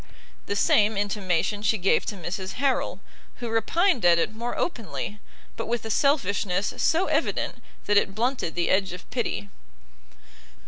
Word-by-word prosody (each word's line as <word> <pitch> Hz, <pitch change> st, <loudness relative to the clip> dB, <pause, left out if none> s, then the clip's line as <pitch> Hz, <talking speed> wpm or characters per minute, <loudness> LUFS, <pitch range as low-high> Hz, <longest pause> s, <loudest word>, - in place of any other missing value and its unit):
The 200 Hz, -, -1 dB
same 210 Hz, +1 st, +3 dB
intimation 205 Hz, -1 st, 0 dB
she 215 Hz, +1 st, +2 dB
gave 195 Hz, 0 st, +2 dB
to 210 Hz, -, -2 dB
Mrs 190 Hz, +1 st, -5 dB
Harrel, 270 Hz, 0 st, 0 dB, 0.3 s
who 240 Hz, -1 st, -5 dB
repined 245 Hz, -, +2 dB
at 175 Hz, -1 st, +6 dB
it 170 Hz, -, 0 dB
more 235 Hz, +2 st, -4 dB
openly, 210 Hz, -, -3 dB, 0.4 s
but -, -, -4 dB
with 235 Hz, -1 st, -2 dB
a 220 Hz, -, -2 dB
selfishness 200 Hz, -8 st, +1 dB
so 335 Hz, +4 st, +2 dB
evident -, -, -1 dB, 0.2 s
that 205 Hz, -, +3 dB
it 195 Hz, -1 st, +2 dB
blunted 240 Hz, -6 st, -1 dB
the 175 Hz, -1 st, +1 dB
edge 190 Hz, -2 st, +2 dB
of 180 Hz, -, -10 dB
pity. 225 Hz, -4 st, -2 dB
205 Hz, 150 wpm, -26 LUFS, 190-235 Hz, 0.4 s, at